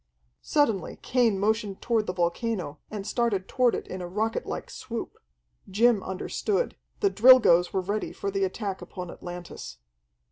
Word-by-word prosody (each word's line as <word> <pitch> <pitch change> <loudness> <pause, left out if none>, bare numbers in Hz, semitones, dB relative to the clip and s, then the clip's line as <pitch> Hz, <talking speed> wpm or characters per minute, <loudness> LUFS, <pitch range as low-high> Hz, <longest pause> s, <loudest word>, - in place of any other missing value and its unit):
Suddenly 230 -11 +1
Cain 240 -5 +2
motioned 210 -1 0
toward 225 -3 0
the 180 - -1
volcano, 175 -2 -1
and 205 -2 -5
started 215 -5 0
toward 250 -3 +2
it - - -5
in 185 - -6
a 175 - -5
rocketlike 220 +4 -2
swoop. - - -6 0.5
Jim 220 +2 +4
understood. 400 - -2 0.3
The 400 -2 +3
Drilgoes 215 -8 +7
were 190 - 0
ready 205 +3 -2
for 200 - -4
the 195 0 0
attack 195 0 -3
upon 180 -2 -7
Atlantis. 175 - -8
205 Hz, 145 wpm, -27 LUFS, 185-235 Hz, 0.5 s, Drilgoes